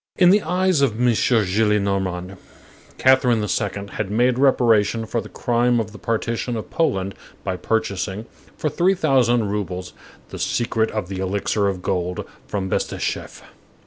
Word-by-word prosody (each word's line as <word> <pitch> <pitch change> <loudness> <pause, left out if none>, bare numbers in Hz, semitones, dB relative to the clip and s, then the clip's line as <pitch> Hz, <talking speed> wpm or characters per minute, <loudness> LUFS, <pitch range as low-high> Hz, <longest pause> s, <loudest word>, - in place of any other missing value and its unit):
In 180 -1 +6
the 205 +2 +5
eyes 185 -4 +1
of 115 -5 +1
M. 125 0 +3
Gillenormand, 100 -4 +1 0.6
Catherine 130 -3 +4
the 105 - -2
Second 100 -1 -2
had 105 -2 -3
made 120 +4 +2
reparation 115 -5 +3
for 115 +1 -2
the - - -11
crime 120 0 +1
of 110 -1 -3
the 105 - -12
partition 115 +1 -2
of 105 -5 -7
Poland 100 - 0 0.3
by 95 - -2
purchasing, 100 0 -2 0.3
for - - -1
three 180 +5 +2
thousand 120 - +2
roubles, 90 -3 -4 0.4
the - - -8
secret 115 -2 0
of 105 -4 -3
the 95 -1 -5
elixir 100 +2 0
of 95 -2 -3
gold, 90 -1 -2 0.2
from 100 -2 -2
Bestucheff. - - -3
110 Hz, 150 wpm, -22 LUFS, 100-125 Hz, 0.6 s, In